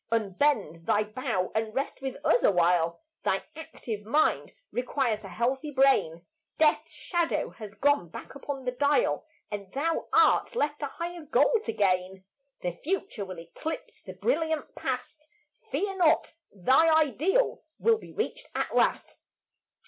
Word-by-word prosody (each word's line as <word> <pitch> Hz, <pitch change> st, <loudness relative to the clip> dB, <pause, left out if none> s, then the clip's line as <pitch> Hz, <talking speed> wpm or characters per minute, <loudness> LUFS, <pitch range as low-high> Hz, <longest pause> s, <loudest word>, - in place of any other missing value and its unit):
Unbend 200 Hz, -, 0 dB
thy 210 Hz, -, +3 dB
bow 210 Hz, -4 st, -2 dB
and 220 Hz, 0 st, -2 dB
rest 275 Hz, 0 st, -2 dB
with 265 Hz, -1 st, -4 dB
us 245 Hz, -, +4 dB
awhile; 170 Hz, -2 st, +3 dB, 0.2 s
Thy -, -, 0 dB
active 230 Hz, -9 st, -6 dB
mind 290 Hz, +9 st, +1 dB, 0.2 s
requires 245 Hz, -3 st, -1 dB
a -, -, -7 dB
healthy 250 Hz, -, -1 dB
brain; 265 Hz, -, +3 dB, 0.3 s
Death's 310 Hz, -1 st, +3 dB
shadow 345 Hz, -2 st, -1 dB
has 210 Hz, -3 st, -10 dB
gone 285 Hz, -, +2 dB
back -, -, -9 dB
upon 280 Hz, -1 st, -6 dB
the 250 Hz, -, 0 dB
dial, 285 Hz, -, +1 dB, 0.2 s
And 200 Hz, -2 st, -5 dB
thou 320 Hz, +4 st, -1 dB
art -, -, +4 dB
left 295 Hz, -8 st, 0 dB
a 290 Hz, -, -1 dB
higher 345 Hz, +4 st, -6 dB
goal 320 Hz, -, +3 dB
to 225 Hz, -, -1 dB
gain; 190 Hz, -2 st, 0 dB, 0.4 s
The 180 Hz, -, 0 dB
future 340 Hz, -, -2 dB
will 185 Hz, -2 st, -8 dB
eclipse 170 Hz, -, -7 dB
the -, -, -9 dB
brilliant 320 Hz, -, -1 dB
past; 270 Hz, +4 st, -5 dB, 0.4 s
Fear 390 Hz, -1 st, -1 dB
not; 335 Hz, -4 st, +3 dB, 0.2 s
thy 260 Hz, -, +4 dB
ideal 330 Hz, -, +1 dB, 0.2 s
will 450 Hz, -1 st, +3 dB
be -, -, -12 dB
reached 480 Hz, +3 st, -3 dB
at -, -, -2 dB
last. -, -, +1 dB
265 Hz, 145 wpm, -28 LUFS, 205-315 Hz, 0.4 s, us